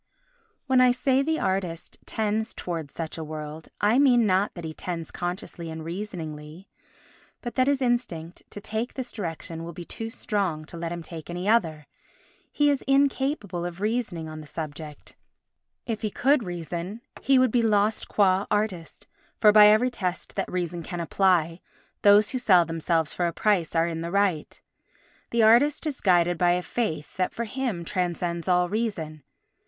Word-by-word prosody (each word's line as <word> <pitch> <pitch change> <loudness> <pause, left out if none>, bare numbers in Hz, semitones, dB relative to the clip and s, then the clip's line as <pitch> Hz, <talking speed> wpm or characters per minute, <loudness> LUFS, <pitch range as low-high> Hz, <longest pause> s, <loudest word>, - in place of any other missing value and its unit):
When 260 -2 +4
I 255 - +6
say 255 +2 +2
the 315 +3 0
artist 185 -3 -3
tends 220 +1 -1
towards 165 -5 -5
such 165 0 -5
a - - -4
world, 155 0 -7
I 215 +5 +3
mean 245 -5 +5
not 195 +1 +1
that 175 - -7
he 160 - -5
tends 165 0 -5
consciously 175 -1 -5
and 160 0 -6
reasoningly 165 -3 -7 0.7
but 240 - -6
that 255 0 +2
his 280 -1 +2
instinct 210 -10 -2
to - - -8
take 220 +4 -4
this 255 -2 -5
direction 165 -4 -5
will 170 +1 -7
be 175 +1 -8
too 225 +5 -5
strong 195 -9 -2
to 165 - -11
let 165 0 -4
him 170 -1 -5
take 160 -1 -9
any 175 +2 -4
other. 165 -10 +2 0.7
He 290 0 +3
is 280 - -1
incapable 270 - +1
of 175 0 -5
reasoning 210 -6 -2
on 155 0 -7
the 150 - -12
subject; 150 -1 -8 0.7
if 225 -4 -3
he 215 - -1
could 275 +6 +2
reason 175 +2 -5 0.2
he 270 -1 +4
would 255 -2 +4
be 240 - +3
lost 215 -1 +1
qua 195 -1 +2
artist; 205 -6 -2 0.3
for, 210 - +7
by 210 0 +8
every 220 +4 +4
test 185 -5 -4
that 195 - -3
reason 175 -1 -2
can 175 +1 -6
apply, 170 -1 +1 0.4
those 205 +1 +6
who 255 - -2
sell 185 -8 +5
themselves 165 -1 -1
for 175 - 0
a - - -1
price 195 -7 +1
are 165 0 +3
in 165 -1 -3
the 170 - -4
right. 195 -5 0 0.7
The 235 -1 +2
artist 250 +9 +5
is 295 -4 -3
guided 175 -3 +3
by 175 -1 +4
a 180 0 -1
faith 160 -12 -3
that 185 -1 0
for 235 - -2
him 230 -7 -3
transcends 175 -1 -2
all 180 -1 +3
reason. 175 -8 -3
185 Hz, 175 wpm, -26 LUFS, 165-225 Hz, 0.7 s, by